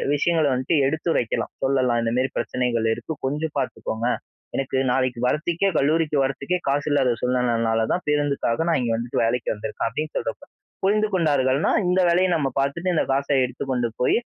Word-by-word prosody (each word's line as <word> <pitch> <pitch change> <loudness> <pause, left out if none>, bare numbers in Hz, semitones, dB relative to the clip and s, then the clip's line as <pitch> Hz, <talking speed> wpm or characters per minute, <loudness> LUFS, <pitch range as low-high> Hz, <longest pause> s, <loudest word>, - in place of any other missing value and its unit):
விஷயங்கள 160 +1 +2
வந்துட்டு 130 +5 +1
எடுத்துரைக்கலாம், 155 -5 -1
சொல்லலாம். 130 -3 +2
இந்தமாரி 125 +3 0
பிரச்சனைகள் 120 -3 0
இருக்கு. 160 - -5
கொஞ்சம் 150 +3 -2
பார்த்துக்கோங்க. 120 -3 -3 0.5
எனக்கு 135 -1 -1
நாளைக்கு 130 -1 0
வர்றத்துக்கே, 170 +7 +1
கல்லூரிக்கு 150 +1 +2
வர்றதுக்கே 140 +6 -1
காசு 140 +1 +1
இல்லாத 130 -4 +3
சூழ்நிலைனால 115 -3 +1
தான் 180 - -2
பேருந்துக்காக 145 -1 0
நான் 165 - +2
இங்க 120 -2 -1
வந்துட்டு 120 +1 -2
வேலைக்கு 120 +1 0
வந்திருக்கேன். 105 0 -4
அப்பிடின்னு 150 +7 -4
சொல்றப்ப, - - -4 0.4
புரிந்து 210 +2 +3
கொண்டார்கள்னா, 145 -5 +2 0.2
இந்த 180 +1 +2
வேலைய 180 +2 +3
நம்ம 145 -4 0
பார்த்துட்டு 170 +7 0
இந்த - - +2
காச 140 +1 0 0.2
எடுத்துக் 130 +2 -5
கொண்டு 120 -2 +1
போயி, 125 - +3
135 Hz, 155 wpm, -23 LUFS, 125-160 Hz, 0.5 s, இல்லாத